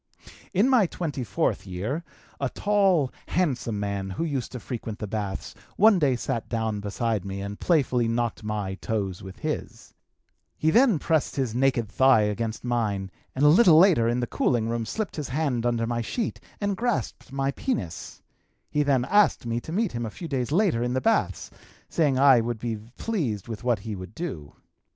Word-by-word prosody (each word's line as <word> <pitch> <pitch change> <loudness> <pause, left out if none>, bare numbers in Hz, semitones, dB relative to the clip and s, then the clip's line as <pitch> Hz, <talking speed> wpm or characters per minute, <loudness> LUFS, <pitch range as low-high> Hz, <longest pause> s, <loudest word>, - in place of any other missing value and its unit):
"In 200 +6 +3
my 250 -8 +4
twenty 150 -7 -4
fourth 95 - -1
year, 105 - -3 0.4
a 135 - 0
tall, 195 -9 +2 0.2
handsome 130 - 0
man 100 -1 -3
who 95 - -3
used 140 -6 -2
to 125 - -5
frequent 115 -3 -6
the 110 - -4
baths 100 -2 -4 0.2
one 210 -2 +6
day 140 -5 +3
sat 120 -1 -3
down 110 -2 -1
beside 105 0 -1
me 100 0 -5
and 100 +1 -6
playfully 130 -8 +2
knocked 115 -1 -1
my 105 -3 -2
toes 95 -2 -3
with 95 0 -10
his; - - -5 0.6
he 160 - +2
then 235 -3 +5
pressed 160 0 0
his 130 -5 -1
naked 125 -2 +2
thigh 130 +1 +4
against 110 +2 -2
mine 105 -6 -1 0.2
and 135 +3 +2
a - - +8
little 170 +1 +7
later 165 -10 +6
in 120 +1 0
the - - 0
cooling 120 -1 0
room 115 -1 -2
slipped 215 - -3
his 150 - -4
hand 130 -4 0
under 115 -1 0
my 120 0 -1
sheet 225 - -3 0.2
and 205 -2 -1
grasped 195 - -2
my 135 0 0
penis; 90 - -4 0.5
he 150 - +2
then 135 -4 +2
asked 205 -7 +3
me 115 0 -1
to 160 - -9
meet 210 +3 0
him 120 0 -3
a 115 - -3
few 170 +10 -8
days 130 -3 -2
later 175 - +2
in 120 +1 0
the 130 - +1
baths, 225 - 0 0.4
saying 145 -6 +2
I 135 -3 +6
would 120 0 -2
be 115 0 -3 0.2
pleased 135 - -2
with 110 -2 -6
what 120 -2 +2
he 110 +1 -5
would 95 +3 -9
do. 80 - -6
120 Hz, 190 wpm, -26 LUFS, 110-155 Hz, 0.6 s, a